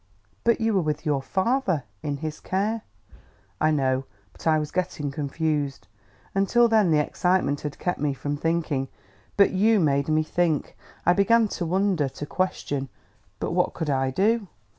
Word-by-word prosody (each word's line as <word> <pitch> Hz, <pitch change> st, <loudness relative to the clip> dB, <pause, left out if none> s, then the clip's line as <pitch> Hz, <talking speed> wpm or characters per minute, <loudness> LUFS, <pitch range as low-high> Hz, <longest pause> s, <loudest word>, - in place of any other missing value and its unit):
"But 235 Hz, 0 st, +3 dB
you 225 Hz, -1 st, +1 dB
were 190 Hz, -, +3 dB
with 155 Hz, -2 st, -2 dB
your 145 Hz, -3 st, +1 dB
father, 190 Hz, -, 0 dB, 0.2 s
in 145 Hz, -1 st, -2 dB
his 155 Hz, +1 st, -5 dB
care 210 Hz, +4 st, -1 dB, 0.4 s
" -, -, -34 dB
"I 155 Hz, -, +4 dB
know, 135 Hz, -3 st, +1 dB, 0.3 s
but -, -, -8 dB
I 160 Hz, -1 st, +5 dB
was 150 Hz, -1 st, -3 dB
getting 175 Hz, -6 st, -2 dB
confused. 145 Hz, 0 st, -2 dB, 0.5 s
Until 215 Hz, +5 st, +4 dB
then 220 Hz, -5 st, +4 dB
the 155 Hz, -, +4 dB
excitement 150 Hz, -1 st, +1 dB
had 145 Hz, -1 st, -5 dB
kept 180 Hz, -, -2 dB
me 145 Hz, -1 st, 0 dB
from 145 Hz, +3 st, -3 dB
thinking. 155 Hz, -3 st, -1 dB, 0.5 s
But 200 Hz, -, +6 dB
you 215 Hz, +3 st, +3 dB
made 140 Hz, -4 st, +2 dB
me 155 Hz, 0 st, +2 dB
think. 160 Hz, -1 st, 0 dB, 0.3 s
I 175 Hz, -, +6 dB
began 225 Hz, +4 st, +4 dB
to 175 Hz, -, -3 dB
wonder, 185 Hz, -5 st, +1 dB
to 145 Hz, -, -7 dB
question... 145 Hz, -6 st, -2 dB, 0.5 s
But -, -, -2 dB
what -, -, +1 dB
could 155 Hz, -3 st, -2 dB
I 135 Hz, -1 st, +1 dB
do?" 205 Hz, -, +1 dB
160 Hz, 170 wpm, -25 LUFS, 145-195 Hz, 0.5 s, But